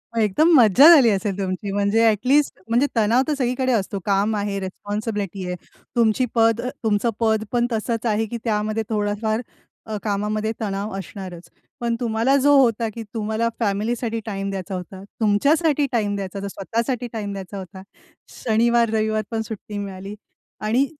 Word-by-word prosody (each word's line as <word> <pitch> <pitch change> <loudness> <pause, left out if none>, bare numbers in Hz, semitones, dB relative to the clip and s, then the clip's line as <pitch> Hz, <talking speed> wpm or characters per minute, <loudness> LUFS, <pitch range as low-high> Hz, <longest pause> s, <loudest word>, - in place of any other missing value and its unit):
मग 225 - +2
एकदम 260 - +3
मज्जा 245 - +7
झाली 260 -7 +6
असेल 200 -1 -1
तुमची 195 +1 -3
म्हणजे 205 +3 +2
ॲटलीस्ट 255 +7 +2
म्हणजे 240 +5 +3
तणाव 230 +3 +3
तर 305 - +1
सगळीकडे 255 -1 0
असतो. 200 -2 -1
काम 205 +2 +1
आहे, 200 -1 -2
रिस्पॉन्सिबिलिटी 205 0 -4
आहे. 180 - -3 0.4
तुमची 235 +1 +3
पद 225 0 +3 0.2
तुमचं 215 +1 +1
पद 220 -2 +2
पण 240 -1 +1
तसंच 225 +1 -2
आहे 220 -1 +1
की 235 +2 -5
त्यामध्ये 215 0 -1
थोडाफार 215 +1 -1 0.5
अ, 215 - -2
कामामध्ये 210 +1 -1
तणाव 200 0 -3
असणारच. 185 -3 -8 0.3
पण 235 -1 0
तुम्हाला 235 +3 +1
जो 285 +1 +4
होता 230 -4 +3
की 230 - -6
तुम्हाला 220 +1 -1
फॅमिलीसाठी 225 +2 -1
टाईम 195 -2 -3
द्यायचा 195 0 -4
होता, 185 +1 -7 0.2
तुमच्यासाठी 285 +8 +3
टाईम 210 -4 0
द्यायचा 200 0 -5
होता, 200 - -4
स्वतःसाठी 230 +5 -2
टाईम 210 -2 -4
द्यायचा 195 0 -7
होता. 190 0 -9 0.5
शनिवार-रविवार 220 -1 +1
पण 225 -1 -1
सुट्टी 215 -1 -7
मिळाली. 195 0 -6 0.5
आणि 230 +6 +2
215 Hz, 155 wpm, -22 LUFS, 200-235 Hz, 0.5 s, मज्जा